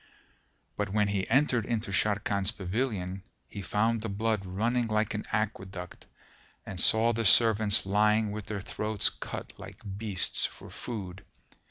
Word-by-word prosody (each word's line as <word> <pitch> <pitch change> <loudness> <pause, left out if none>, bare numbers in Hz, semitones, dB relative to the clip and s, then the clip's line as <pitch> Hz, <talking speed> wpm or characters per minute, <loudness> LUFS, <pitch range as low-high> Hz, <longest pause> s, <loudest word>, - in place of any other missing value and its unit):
But 105 -1 -1
when 105 0 +1
he 100 -2 -1
entered 130 -2 +3
into 110 -3 -2
Sharrkan's 100 0 +1
pavilion, 95 -3 -3 0.2
he 100 - -7
found 105 +5 0
the 110 - -4
blood 110 0 -1
running 115 +6 0
like 110 -1 0
an 105 - -4
aqueduct 95 -4 -4 0.6
and 95 - -6
saw 115 +4 +4
the 115 +1 -1
servants 110 -2 +5
lying 105 +2 +2
with 105 0 -6
their 105 -2 -4
throats 105 +1 +1
cut - - -7
like - - -10 0.2
beasts 105 -4 +1
for - - -13
food. 95 -6 -6
105 Hz, 145 wpm, -29 LUFS, 100-110 Hz, 0.6 s, servants